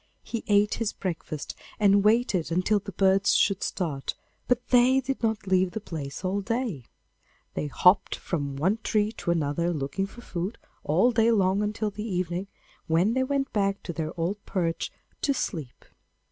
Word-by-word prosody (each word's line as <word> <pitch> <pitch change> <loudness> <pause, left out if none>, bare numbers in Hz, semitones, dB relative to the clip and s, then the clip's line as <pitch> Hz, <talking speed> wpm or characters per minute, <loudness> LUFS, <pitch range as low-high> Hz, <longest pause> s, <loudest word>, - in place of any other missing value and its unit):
He 230 - -4
ate 205 0 +4
his 220 - 0
breakfast, 160 -5 -4 0.3
and 200 -1 +5
waited 210 -6 +2
until 185 +5 +2
the 200 0 -8
birds 195 +1 +3
should 195 -2 +3
start, 150 -8 -2 0.3
but 250 0 +1
they 255 +1 +5
did 270 0 -3
not 220 -2 0
leave 185 -1 +3
the 220 - -2
place 160 -4 -6
all 195 +2 0
day. 225 - -2 0.7
They 150 - -2
hopped 180 +7 +4
about - - -16
from 140 -5 -2
one 185 +10 +1
tree 210 0 +1
to 200 - -6
another 170 +1 +1
looking 160 +5 -2
for 240 - -13
food, 185 -1 -4 0.3
all 185 +12 +3
day 225 0 +3
long 195 -2 +3
until 210 0 -1
the 210 - -7
evening, 180 +1 -2 0.4
when 175 +7 +3
they 260 - +1
went 275 0 -1
back 200 -1 0
to 170 - -5
their 160 -1 -3
old 195 +5 -2
perch 170 -3 -2 0.3
to 280 -2 +1
sleep. 155 - -4
195 Hz, 175 wpm, -27 LUFS, 170-220 Hz, 0.7 s, and